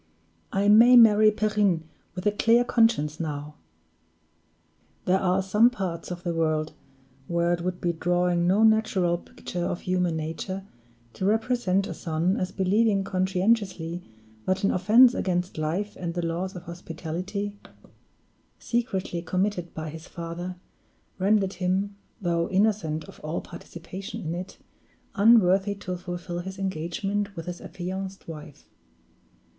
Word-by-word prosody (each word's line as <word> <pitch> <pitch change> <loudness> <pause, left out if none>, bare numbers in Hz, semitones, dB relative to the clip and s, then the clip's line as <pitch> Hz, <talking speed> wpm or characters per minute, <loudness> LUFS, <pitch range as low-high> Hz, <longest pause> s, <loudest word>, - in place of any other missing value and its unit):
"I 200 +1 +1
may 230 +4 +8
marry 215 -2 +7
Perrine 210 -5 +1 0.3
with 180 +2 -6
a 210 - +4
clear 230 +3 +4
conscience 225 -11 +2
now!" 150 -2 -4 1.5
There 185 +1 +3
are 190 0 +1
some 210 +5 +5
parts 190 -9 -4
of 175 -1 -6
the 175 -2 -1
world 155 -1 0 0.5
where 170 0 +1
it 175 - -2
would 180 0 -3
be 175 -1 0
drawing 175 +1 +1
no 200 +4 +4
natural 215 -6 +3
picture 175 0 -6
of 175 - -2
human 180 -2 0
nature 165 +5 -4 0.5
to 190 - -3
represent 215 -3 +1
a - - -5
son 165 +3 -1
as 185 - -2
believing 200 +1 +2
conscientiously 185 -2 0 0.5
that 185 +1 0
an 195 - +3
offense 230 +7 +6
against 180 -4 -1
life 180 +7 -2
and 170 -1 -5
the 175 -1 -1
laws 175 +3 -3
of 180 - -7
hospitality, 180 +4 -5 1.0
secretly 195 -7 -2
committed 185 -1 -1
by 155 -1 -5
his 160 +2 -10
father, 170 +2 -6 0.6
rendered 195 0 +2
him, 190 +3 0 0.2
though 170 -3 0
innocent 190 -6 +1
of - - -14
all 155 +2 -3
participation 180 +3 -8
in 160 0 -3
it, 180 +2 -6 0.6
unworthy 200 -2 +5
to 185 -2 -5
fulfill 175 -1 -5
his 190 +2 -6
engagement 195 +3 -2
with 165 -2 -6
his 175 0 -6
affianced 190 +1 -6
wife. 155 -2 -10
185 Hz, 135 wpm, -26 LUFS, 170-200 Hz, 1.5 s, may